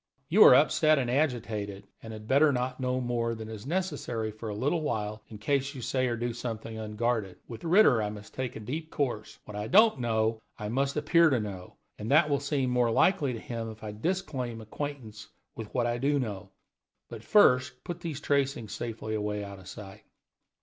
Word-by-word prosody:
You - - +7
are - - +10
upset 155 0 +4
and 125 -3 0
agitated, 110 -8 -1 0.2
and 115 - -8
had 110 -1 -9
better 145 +4 +5
not 125 0 -2
know 130 0 0
more 120 -2 -1
than 110 -1 -7
is 110 +2 -8
necessary 145 -10 -2
for 110 +1 -7
a 105 - -4
little 145 +9 0
while, 110 -6 -3
in 110 - -10
case 135 +5 -1
you 125 - -7
say 130 +1 0
or 120 - -1
do 120 +1 -2
something 115 -1 -5
unguarded. 110 -3 -2
With 115 - -9
Ritter 165 - +5
I 105 - -1
must 105 0 -10
take 130 -2 -4
a - - -6
deep 155 +9 -5
course; 125 -9 -3
what 105 - -9
I 105 +1 -3
don't 215 - +5
know 110 -2 0 0.2
I 105 -2 -5
must 135 +4 0
appear 165 +2 +4
to 130 -4 +2
know, 95 -4 -7 0.2
and 105 - -5
that 150 +1 +4
will 140 - +2
seem 140 -3 -1
more 125 -1 +2
likely 145 +4 +3
to 115 - -5
him 115 0 -5
if 110 0 -11
I 105 - -4
disclaim 130 - -3
acquaintance 110 -2 -7 0.3
with 110 -2 -7
what 120 -2 0
I 120 0 -1
do 145 +3 +2
know. 105 -8 -4 0.6
But 115 -2 -9
first 130 - +4
put 175 -1 -5
these 165 -5 -5
tracings 140 -6 0
safely 115 -2 -5
away 105 -1 -2
out 100 -1 -8
of 95 - -14
sight." 95 -2 -10
120 Hz, 205 wpm, -29 LUFS, 110-140 Hz, 0.6 s, are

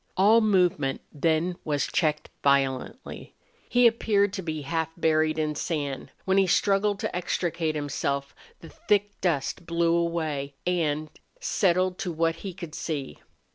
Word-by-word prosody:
All 215 +5 +6
movement 180 -10 +2
then 160 +4 +1
was 145 -2 0
checked 155 -2 0
violently. 140 - 0 0.3
He 245 0 +4
appeared 210 -4 +3
to 190 - -3
be 155 -4 -4
half 160 +2 -1
buried 155 -1 +2
in 155 -1 0
sand. 145 -3 -3 0.2
While 190 0 +2
he 195 -1 +4
struggled 200 +2 +2
to - - -3
extricate 170 -2 -1
himself 140 -1 -2 0.3
the - - -11
thick 205 - -1
dust 165 0 -1
blew 170 0 +2
away 160 -5 -1
and, 155 -4 0 0.3
settled 185 - +1
so 175 - -3
that 165 +1 0
he 195 - -6
could 170 -4 -9
see. 150 -5 -4
165 Hz, 140 wpm, -26 LUFS, 150-190 Hz, 0.3 s, All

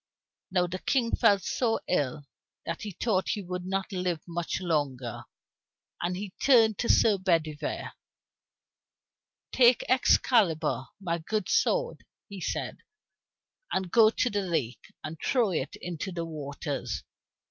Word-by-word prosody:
Now 180 -1 +2
the 180 +1 -5
King 240 0 +1
felt 200 -2 +4
so 225 +2 0
ill 145 -3 -1 0.4
that 165 - -4
he 215 - -4
thought 195 0 0
he 205 - -5
would 180 0 -5
not 195 +1 -2
live 180 -4 -2
much 170 0 -3
longer, 140 - -2 0.8
and 180 +1 -1
he 195 -1 -6
turned 225 -6 +5
to 235 - -1
Sir 210 -3 +5
Bedivere: 160 -5 -1 1.6
"Take 245 -1 +5
Excalibur, 170 - +3
my 170 -3 -2
good 215 +6 -2
sword," 485 +2 +1 0.2
he 200 -2 -9
said, - - -3 0.9
"and 185 -2 -1
go 225 -2 +7
with 215 - +3
it - - -39
to 245 - +1
the 205 0 0
lake, 155 - -2 0.2
and 155 +1 -6
throw 240 -7 +2
it 145 -5 -2
into 175 +2 -5
its 180 - -9
waters. 145 - -4
180 Hz, 140 wpm, -28 LUFS, 160-210 Hz, 1.6 s, go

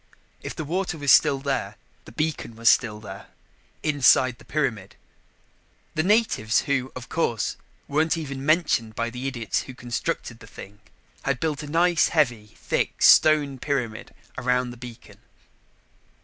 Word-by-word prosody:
If - - -7
the 155 - -5
water 180 +2 -2
was 145 -2 +2
still 140 - +5
there, 135 -1 -3 0.3
the - - -12
beacon 155 -7 -3
was 115 0 +3
still 110 -4 +2
there 100 -2 -10 0.6
inside 130 -4 +3
the - - -17
pyramid. 125 -11 -2 1.0
The 155 - 0
natives, 190 - +2
who, 135 -3 -1
of 125 -1 -8
course, 120 -9 -1 0.3
weren't 160 +3 +1
even 140 -4 -5
mentioned 150 -8 +1
by 115 0 -2
the 125 +2 -5
idiots 120 -6 -2
who 130 - -10
constructed 120 -2 -4
the - - -14
thing, 105 +1 -12 0.4
had 140 -2 -1
built 155 -3 -2
a 150 - -7
nice 170 +2 +3
heavy, 120 -9 0
thick - - -2
stone 145 -4 +5
pyramid 125 -7 -3 0.3
around 125 0 0
the - - -10
beacon. 120 -1 -12
135 Hz, 150 wpm, -24 LUFS, 120-155 Hz, 1.0 s, still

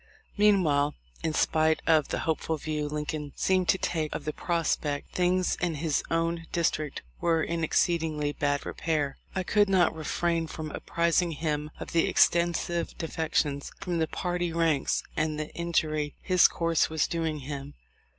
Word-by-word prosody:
Meanwhile, 170 -9 +3 0.3
in 160 - 0
spite 160 0 +3
of 155 -3 +4
the - - -2
hopeful 160 0 -1
view 150 0 -3
Lincoln 150 -1 -4
seemed 185 -1 +1
to - - +5
take 160 -4 -2
of - - -5
the 155 - -2
prospect, 160 -4 -1
things 180 0 +2
in 175 -3 -1
his 155 0 0
own 165 0 -1
district 155 -3 -1 0.2
were 165 -2 +2
in 170 -1 -2
exceedingly 160 -3 +1
bad 145 -1 -1
repair. 150 -4 -2 0.2
I 190 - 0
could 205 +2 +3
not 185 -3 +4
refrain 165 +1 -1
from 155 -1 -6
apprising 170 0 +1
him 150 -1 -2
of - - -7
the 165 - +3
extensive 170 0 +2
defections 155 -3 -1
from 175 -2 -2
the 160 - +1
party 175 0 -2
ranks, 165 -4 +1
and 155 0 -1
the 155 - -5
injury 155 -3 -1
his 185 -1 +5
course 165 -1 +1
was 160 -2 +1
doing 160 -3 -2
him. 140 0 -6
160 Hz, 155 wpm, -28 LUFS, 150-170 Hz, 0.3 s, to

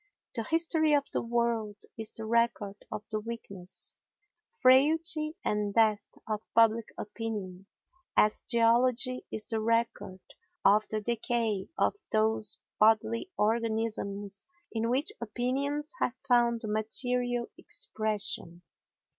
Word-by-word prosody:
The 230 - -2
history 320 0 +2
of 285 - +2
the - - 0
world 230 -3 -1 0.2
is 220 -1 -5
the 220 - -6
record 225 -3 0
of 210 - -6
the 215 - -1
weakness, 200 -5 -8 0.6
frailty 305 +4 +4
and 210 -1 -1
death 215 -3 +3 0.2
of 215 -1 -2
public 225 0 +4
opinion, 205 -4 -6 0.5
as 210 0 +3
geology 245 +2 +2
is 215 - -3
the 225 -1 -2
record 230 -4 -1 0.5
of 215 +1 +5
the 215 0 -2
decay 230 -3 -1
of - - +2 0.2
those 215 -1 +4 0.2
bodily 225 - +3
organisms 215 -3 -1 0.2
in 225 0 -1
which 270 +6 +2
opinions 275 +6 -2
have 250 - 0
found 240 -2 +3
material 245 +3 +1
expression. 205 -5 -2
225 Hz, 115 wpm, -29 LUFS, 215-245 Hz, 0.6 s, of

